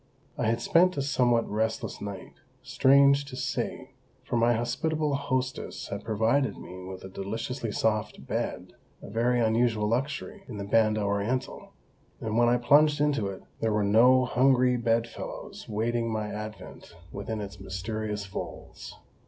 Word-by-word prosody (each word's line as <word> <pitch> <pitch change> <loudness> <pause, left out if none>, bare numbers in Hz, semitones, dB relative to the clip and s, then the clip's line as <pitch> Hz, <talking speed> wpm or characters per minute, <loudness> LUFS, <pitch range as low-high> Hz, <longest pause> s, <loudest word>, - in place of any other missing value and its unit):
I - - -1
had 115 +1 +1
spent 180 +7 +4
a - - +1
somewhat 120 -4 +2
restless 110 +1 -2
night, 100 -2 -7 0.3
strange 140 +1 +5
to 140 -2 -9
say, - - -3 0.3
for - - -3
my 120 +1 +4
hospitable 150 +6 -1
hostess 130 -2 -2
had 100 +1 -5
provided 115 +5 +1
me 90 +1 -9
with 95 0 -8
a - - -6
deliciously 115 +5 -4
soft 105 0 -1
bed, - - -3 0.3
a - - -9
very 120 +3 +2
unusual 110 -1 +2
luxury 140 - -2
in 115 -6 -7
the 100 - -4
Banda 110 +1 +2
Orientál, 100 +5 -2 0.5
and 110 -1 -3
when 120 0 +4
I 120 - +4
plunged 145 +4 +4
into 145 -8 +1
it 95 -1 -7 0.2
there 110 - 0
were 105 0 +2
no 125 +5 +5
hungry 125 0 +3
bedfellows 115 -1 -3
waiting 115 +2 -1
my 110 -1 -2
advent 105 -4 -8 0.2
within 105 +2 -4
its 100 -1 -7
mysterious 105 +2 -4
folds. 95 - -8
115 Hz, 150 wpm, -28 LUFS, 105-130 Hz, 0.5 s, strange